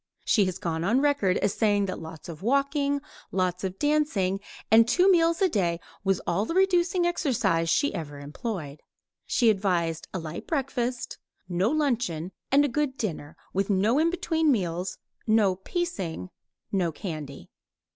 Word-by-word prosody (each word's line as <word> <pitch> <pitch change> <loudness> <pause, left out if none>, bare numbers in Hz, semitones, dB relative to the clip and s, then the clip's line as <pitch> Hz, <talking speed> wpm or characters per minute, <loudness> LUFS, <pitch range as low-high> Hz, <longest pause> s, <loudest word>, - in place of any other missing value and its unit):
She 205 -4 +4
has 185 -1 -2
gone 165 -2 -2
on 225 +8 +3
record 280 -10 +2
as 200 - 0
saying 205 -2 +2
that 185 - -4
lots 160 -1 -9
of 165 -3 -8
walking, 280 +4 +1 0.3
lots 185 -1 -1
of 190 0 -3
dancing, 290 -11 +1 0.3
and 225 +1 +7
two 370 +6 +5
meals 335 0 +3
a - - +6
day 175 - 0 0.2
was 195 -2 +2
all 175 +4 0
the 330 - -3
reducing 360 -2 +3
exercise 235 - +1
she 285 - +2
ever 150 -5 -5
employed. 150 - -5 0.5
She 235 -3 +4
advised 175 -5 -1
a - - -3
light 165 -1 -6
breakfast, 255 -5 -2 0.3
no 180 +4 +1
luncheon, 240 - 0 0.2
and 285 +2 +5
a - - +2
good 280 0 -1
dinner, 160 -7 -4 0.2
with 195 +2 0
no 205 +3 +3 0.2
between 325 -3 +1
meals, 180 -4 -1 0.3
no 215 -4 +4
"piecing," 190 - -4 0.4
no 180 -4 +1
candy. 155 -5 -7
200 Hz, 155 wpm, -27 LUFS, 175-280 Hz, 0.5 s, and